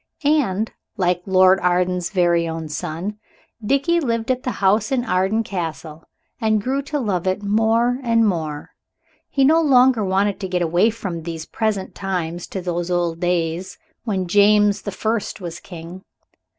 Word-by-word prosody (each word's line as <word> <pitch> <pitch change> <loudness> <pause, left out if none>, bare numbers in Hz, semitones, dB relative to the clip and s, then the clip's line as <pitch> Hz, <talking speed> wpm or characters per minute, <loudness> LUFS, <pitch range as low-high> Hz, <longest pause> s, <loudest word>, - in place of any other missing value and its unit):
And, 235 -9 +1 0.3
like 180 -2 +1
Lord 185 0 +5
Arden's 180 0 +1
very 175 -3 +2
own 160 -1 -5
son, 175 +6 -5 0.4
Dickie 275 +9 +2
lived 230 -5 -1
at 255 0 -1
the 255 - -3
house 205 +3 +2
in 250 -2 0
Arden 190 +3 +1
Castle, 160 -5 -5 0.4
and 220 -2 +2
grew 265 +6 -1
to 295 +2 -4
love 190 -7 -1
it 185 +2 -1
more 225 +4 +2
and 230 -3 +3
more. 155 -6 -3 0.6
He 275 -1 +2
no 320 +4 +5
longer 255 -6 +4
wanted 195 +1 0
to 195 - -4
get 180 -1 0
away 175 +6 +3
from 195 -7 -5
these 160 -1 -6
present 215 -4 -2
times 175 -3 -3
to 190 - -5
those 175 -1 -3
old 175 -2 0
days 175 0 -1 0.3
when 195 -5 -1
James 205 +2 +4
the 205 - -5
First 215 +2 -2
was 175 -2 -6
King. 175 0 -10
190 Hz, 160 wpm, -21 LUFS, 175-225 Hz, 0.6 s, Lord